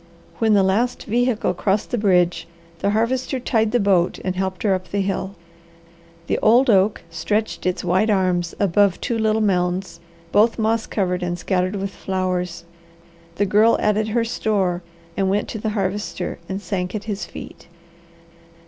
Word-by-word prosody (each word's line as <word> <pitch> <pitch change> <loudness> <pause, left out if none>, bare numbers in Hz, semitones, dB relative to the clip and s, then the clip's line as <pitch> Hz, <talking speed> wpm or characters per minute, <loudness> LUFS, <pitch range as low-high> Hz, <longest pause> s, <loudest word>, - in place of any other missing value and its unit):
When 220 -2 +3
the 195 - +4
last 220 +6 +1
vehicle 240 0 +1
crossed 200 +1 -1
the 245 - 0
bridge, 180 -4 +2 0.3
the 200 - 0
Harvester 250 +5 0
tied 225 -3 +1
the 245 - +2
boat 190 -4 +2
and 185 -1 -1
helped 190 -1 -3
her 205 -3 +3
up 185 -1 -3
the 200 - -1
hill. 195 0 -2 0.9
The - - 0
old 240 +3 +5
oak 200 +1 +2
stretched 205 +6 -2
its 185 - -1
wide 185 +5 +2
arms 180 -4 +1
above 200 -1 +3
two 235 - -2
little 220 0 +2
mounds, 180 -1 0 0.3
both 220 +3 +4
moss 225 0 0
covered 180 -3 -1
and 175 -1 -2
scattered 185 +1 -1
with 195 0 -3
flowers. 180 -3 -3 0.7
The 205 - +1
Girl 215 +4 +4
added 210 0 +1
her 230 +2 +1
store 200 -6 0 0.3
and 195 - 0
then - - +1
went 205 +2 0
to 220 - -5
the 220 - -2
Harvester, 190 -3 -3
and 190 0 -3
sank 180 0 -3
at 210 - -4
his 210 -2 -4
feet. - - -10
200 Hz, 165 wpm, -21 LUFS, 185-220 Hz, 0.9 s, old